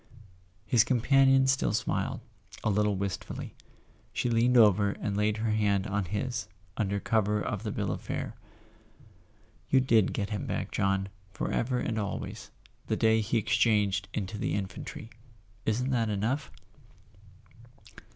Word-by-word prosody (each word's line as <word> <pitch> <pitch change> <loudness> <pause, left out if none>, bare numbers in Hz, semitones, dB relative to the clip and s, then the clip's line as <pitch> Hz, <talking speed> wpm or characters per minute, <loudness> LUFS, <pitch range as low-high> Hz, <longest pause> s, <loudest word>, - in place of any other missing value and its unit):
His 115 -1 +4
companion 135 +3 +4
still 135 0 +2
smiled, - - -1 0.4
a 105 - +2
little 105 0 +2
wistfully. 95 0 -4 0.6
She 120 - 0
leaned 120 +2 +3
over 100 -2 +5
and 100 - -3
laid 105 +1 +1
her 110 0 -1
hand 100 -2 +1
on 100 -1 -1
his, 115 +7 -3 0.3
under 100 -2 -1
cover 105 -1 +1
of 105 -1 -3
the 110 -2 -3
bill 100 -2 -2
of - - -4
fare. - - -4 1.4
"You 135 - +5
did 115 -6 +3
get 100 +1 -3
him 105 - -3
back, - - -3
John, 95 0 0 0.2
forever 125 +4 -1
and 115 -2 -1
always, 100 -2 -5 0.4
the - - 0
day 110 0 +3
he 110 +2 0
exchanged 105 -3 +2
into 100 0 -4
the - - -1
infantry. 100 +3 -6 0.6
Isn't 125 +5 +1
that 115 -3 +1
enough 115 +8 -1
105 Hz, 140 wpm, -29 LUFS, 100-115 Hz, 1.4 s, over